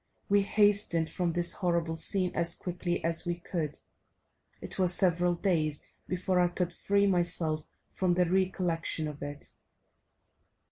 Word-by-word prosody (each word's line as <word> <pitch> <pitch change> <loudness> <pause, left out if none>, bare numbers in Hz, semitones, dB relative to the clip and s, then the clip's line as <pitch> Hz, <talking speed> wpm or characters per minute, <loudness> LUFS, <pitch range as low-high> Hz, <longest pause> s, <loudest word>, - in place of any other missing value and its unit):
We 200 0 +4
hastened 200 -5 +2
from 175 -2 -1
this 175 0 +5
horrible 170 -4 -1
scene 185 +2 0
as 170 0 +2
quickly 175 -1 -3
as 165 0 +1
we 175 0 -2
could; 165 -3 -4 0.8
it - - -5
was 180 -1 +4
several 175 -1 +2
days 160 -5 0 0.2
before 185 0 0
I 175 - +4
could 175 0 -3
free 200 +3 +1
myself 170 -4 +1 0.2
from 180 -2 0
the 180 0 +3
recollection 175 -3 0
of 150 -1 -8
it. 145 0 -7
175 Hz, 140 wpm, -29 LUFS, 165-185 Hz, 0.8 s, this